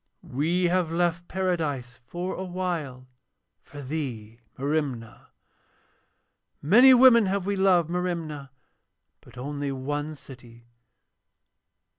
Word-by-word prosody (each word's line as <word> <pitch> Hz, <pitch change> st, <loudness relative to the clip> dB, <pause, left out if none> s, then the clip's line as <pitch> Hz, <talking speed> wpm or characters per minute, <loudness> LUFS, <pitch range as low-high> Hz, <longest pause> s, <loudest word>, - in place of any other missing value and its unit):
'We 165 Hz, +8 st, -1 dB
have 175 Hz, -1 st, +1 dB
left 175 Hz, 0 st, -1 dB
Paradise 155 Hz, -10 st, -2 dB
for 180 Hz, +2 st, -4 dB
awhile 175 Hz, -9 st, -4 dB, 0.5 s
for 145 Hz, -1 st, -11 dB
thee, 125 Hz, -6 st, -5 dB, 0.2 s
Merimna. 135 Hz, -5 st, -3 dB, 1.3 s
'Many 245 Hz, -, +7 dB
women 240 Hz, -4 st, +6 dB
have 195 Hz, -1 st, -1 dB
we 200 Hz, 0 st, -1 dB
loved, 185 Hz, -4 st, +3 dB
Merimna, 165 Hz, -6 st, -3 dB, 0.7 s
but -, -, -18 dB
only 140 Hz, +2 st, -4 dB
one 145 Hz, +3 st, -4 dB
city. 120 Hz, -4 st, -14 dB
155 Hz, 95 wpm, -26 LUFS, 135-180 Hz, 1.3 s, Many